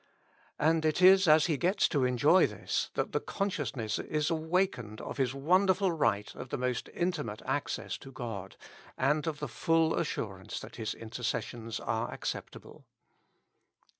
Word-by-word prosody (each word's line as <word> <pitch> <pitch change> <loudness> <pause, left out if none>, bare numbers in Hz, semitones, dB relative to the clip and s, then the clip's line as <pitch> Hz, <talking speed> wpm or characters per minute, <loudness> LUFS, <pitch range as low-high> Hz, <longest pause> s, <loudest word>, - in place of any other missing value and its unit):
And 160 +1 +2
it 155 +1 +1
is 190 0 +7
as 155 0 +6
he 155 -4 +1
gets 185 +5 +2
to 140 -5 +2
enjoy 145 +9 +5
this, - - -2
that - - -1
the - - +1
consciousness 145 - -2
is 155 +1 -1
awakened 160 - -1
of - - -6
his 135 -1 0
won 180 +8 +3
derful 190 0 +3
right 105 -10 0
of 130 - -9
most 125 -1 -2
intimate 155 - -2
access - - -2
to 135 - -11
God, 110 -7 -6 0.4
and 150 +4 +1
of 155 -2 -2
the 150 - -4
full 160 +6 +2
assurance 100 - -3
that - - -10
his 110 -2 -3
intercessions 115 0 -4
are 110 0 -2
ac - - -9
ceptable. - - -12
150 Hz, 155 wpm, -31 LUFS, 120-170 Hz, 0.4 s, is